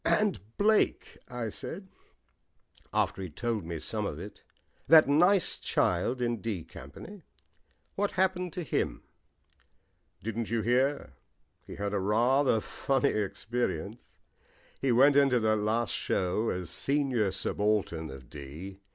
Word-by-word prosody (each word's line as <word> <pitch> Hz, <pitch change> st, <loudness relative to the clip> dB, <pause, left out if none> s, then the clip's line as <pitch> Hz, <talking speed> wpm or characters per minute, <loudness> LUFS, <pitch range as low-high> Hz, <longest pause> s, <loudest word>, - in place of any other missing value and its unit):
"And 210 Hz, -2 st, +2 dB, 0.2 s
Blake," 215 Hz, +1 st, +2 dB
I 120 Hz, -3 st, -4 dB
said, 190 Hz, -, -7 dB, 1.0 s
after -, -, 0 dB
he'd 90 Hz, -6 st, -7 dB
told 115 Hz, -4 st, -2 dB
me 85 Hz, 0 st, -4 dB
some -, -, -3 dB
of -, -, -5 dB
it, -, -, -9 dB, 0.5 s
"that 160 Hz, -1 st, +8 dB
nice 175 Hz, +6 st, +4 dB
child 120 Hz, +8 st, 0 dB
in 120 Hz, -1 st, 0 dB
'D' 100 Hz, -7 st, -3 dB
Company; 75 Hz, -, -11 dB, 0.7 s
what 205 Hz, +1 st, -1 dB
happened 185 Hz, -1 st, 0 dB
to 180 Hz, -, -3 dB
him?" 145 Hz, -, -2 dB, 1.2 s
"Didn't 115 Hz, +1 st, -3 dB
you 115 Hz, -1 st, 0 dB
hear? 125 Hz, -, +1 dB, 0.5 s
He -, -, -8 dB
had 100 Hz, 0 st, -3 dB
rather 115 Hz, +8 st, +3 dB
a 110 Hz, -, 0 dB
funny 135 Hz, +3 st, 0 dB
experience. 110 Hz, +1 st, -3 dB, 0.6 s
He 135 Hz, -, +2 dB
went 135 Hz, +4 st, +6 dB
into 135 Hz, -3 st, +5 dB
that 110 Hz, 0 st, +2 dB
last 110 Hz, +2 st, 0 dB
show 95 Hz, +5 st, 0 dB
as 90 Hz, -2 st, -4 dB
senior 135 Hz, -7 st, 0 dB
subaltern 95 Hz, -5 st, 0 dB
of 65 Hz, -2 st, -10 dB
'D.' 75 Hz, +9 st, -9 dB
115 Hz, 130 wpm, -29 LUFS, 100-140 Hz, 1.2 s, that